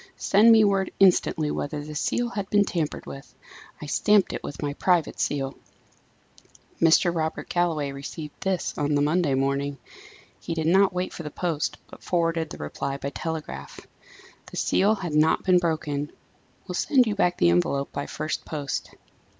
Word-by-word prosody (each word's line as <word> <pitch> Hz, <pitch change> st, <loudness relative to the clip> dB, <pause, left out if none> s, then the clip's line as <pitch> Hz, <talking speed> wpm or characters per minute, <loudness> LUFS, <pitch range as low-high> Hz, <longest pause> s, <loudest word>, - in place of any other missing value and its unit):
"Send 215 Hz, +4 st, +5 dB
me 220 Hz, -1 st, +7 dB
word 195 Hz, -2 st, +2 dB
instantly 175 Hz, -5 st, +3 dB
whether 145 Hz, 0 st, -4 dB
the 150 Hz, -, -7 dB
seal 240 Hz, +10 st, -1 dB
had 200 Hz, -4 st, -4 dB
been 205 Hz, -1 st, +4 dB
tampered 165 Hz, -6 st, -3 dB
with. 135 Hz, 0 st, -10 dB, 0.4 s
I -, -, -7 dB
stamped 205 Hz, +6 st, +3 dB
it -, -, -4 dB
with 145 Hz, -, -6 dB
my 145 Hz, -1 st, -1 dB
private 175 Hz, +1 st, +1 dB
seal." 135 Hz, -2 st, -1 dB, 1.3 s
Mr. 165 Hz, +1 st, +5 dB
Robert 160 Hz, -1 st, -2 dB
Galloway 165 Hz, -5 st, 0 dB
received 145 Hz, +2 st, -7 dB
this 190 Hz, -2 st, -1 dB
on 145 Hz, 0 st, +1 dB
the 145 Hz, -, +2 dB
Monday 155 Hz, -2 st, +2 dB
morning. 140 Hz, +1 st, -1 dB, 0.6 s
He 165 Hz, -, -4 dB
did 160 Hz, -1 st, -2 dB
not 190 Hz, +4 st, +4 dB
wait 180 Hz, 0 st, -3 dB
for -, -, -7 dB
the 150 Hz, -, -5 dB
post, 160 Hz, -1 st, -2 dB
but -, -, -14 dB
forwarded 165 Hz, -2 st, 0 dB
the -, -, -8 dB
reply 135 Hz, -, -4 dB
by 140 Hz, 0 st, -5 dB
telegraph 160 Hz, 0 st, -6 dB, 0.7 s
"The -, -, -9 dB
seal 205 Hz, +3 st, +2 dB
had 180 Hz, -6 st, -5 dB
not 155 Hz, +1 st, +3 dB
been 185 Hz, -2 st, +4 dB
broken. 150 Hz, -4 st, -2 dB, 0.6 s
Will 180 Hz, -, -4 dB
send 255 Hz, -, +3 dB
you 215 Hz, -, 0 dB
back 180 Hz, -3 st, +1 dB
the 85 Hz, -, +4 dB
envelope 140 Hz, +11 st, 0 dB
by 140 Hz, -, -4 dB
first 155 Hz, +1 st, -4 dB
post." 145 Hz, -3 st, -4 dB
160 Hz, 170 wpm, -25 LUFS, 145-185 Hz, 1.3 s, me